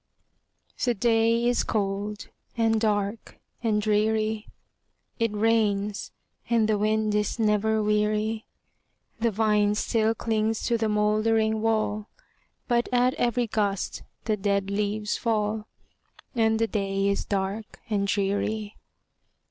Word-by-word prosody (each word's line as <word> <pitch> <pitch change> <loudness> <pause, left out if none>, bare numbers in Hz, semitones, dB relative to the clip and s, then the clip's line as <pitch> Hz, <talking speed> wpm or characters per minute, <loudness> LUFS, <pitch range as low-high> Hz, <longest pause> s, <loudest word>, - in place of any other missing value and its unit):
The 245 -2 +2
day 230 +1 +2
is 245 0 +2
cold, 205 0 -2 0.3
and 225 -1 +2
dark, 205 0 -1 0.2
and 220 -3 +1
dreary; 215 +1 +1 0.7
It 230 -1 +1
rains, 210 -2 +1 0.4
and 230 -2 +3
the 215 -1 +1
wind 215 0 +1
is 210 +2 0
never 220 0 +2
weary; 210 +1 0 0.7
The 230 +1 +2
vine 210 -1 +2
still 220 +1 +1
clings 220 -1 -1
to 235 - +1
the 220 -1 +1
moldering 215 +1 +2
wall, 215 -1 0 0.6
But 240 -1 +1
at 250 +1 +3
every 240 0 +1
gust 205 -3 -1 0.2
the 215 - +1
dead 200 -1 0
leaves 210 +1 -1
fall, 215 -1 -1 0.7
And 225 -3 +2
the 225 - +2
day 195 -2 -1
is 200 0 0
dark 200 +2 -3
and 205 -3 0
dreary. 205 +2 -1
215 Hz, 120 wpm, -26 LUFS, 210-225 Hz, 0.7 s, and